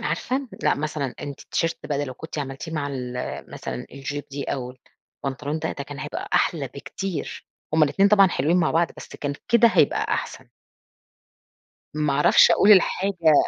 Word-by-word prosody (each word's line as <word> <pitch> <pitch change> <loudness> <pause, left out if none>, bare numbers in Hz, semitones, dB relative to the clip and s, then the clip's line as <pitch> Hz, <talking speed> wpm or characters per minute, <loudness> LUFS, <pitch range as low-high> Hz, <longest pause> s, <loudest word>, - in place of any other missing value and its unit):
عارفة 250 - -2
لأ، - - +3
مثلًا 145 -3 -3
أنتِ 140 -1 -7
الT-shirt 165 0 -1
بقى 145 -2 -2
ده 145 - 0
لو 130 -2 -7
كنتِ 160 +3 -8
عملتيه 135 +3 -5
مع 150 -3 -2
ال 125 -3 -5 0.4
مثلًا 60 0 -6
الJupe 145 +1 -6
دي 140 0 -4
أو 125 -2 -4 0.5
البنطلون 140 +3 -3
ده - - -2
ده 140 - -6
كان 145 -1 -9
هيبقى - - -5
أحلى - - +2
بكتير، 190 -6 -6 0.3
هُم 160 - +4
الإتنين 195 +7 +4
طبعًا 200 -1 +6
حلوين 160 +2 +1
مع 170 -3 +2
بعض 165 0 +2
بس - - -10
كان 145 -1 -3 0.2
كده 235 0 +6
هيبقى - - +2
أحسن. - - -5 1.5
ما 150 -2 0
أعرفش 145 +1 +6
أقول 205 - +5
الحاجة 185 -3 +4
150 Hz, 170 wpm, -24 LUFS, 140-170 Hz, 1.5 s, طبعًا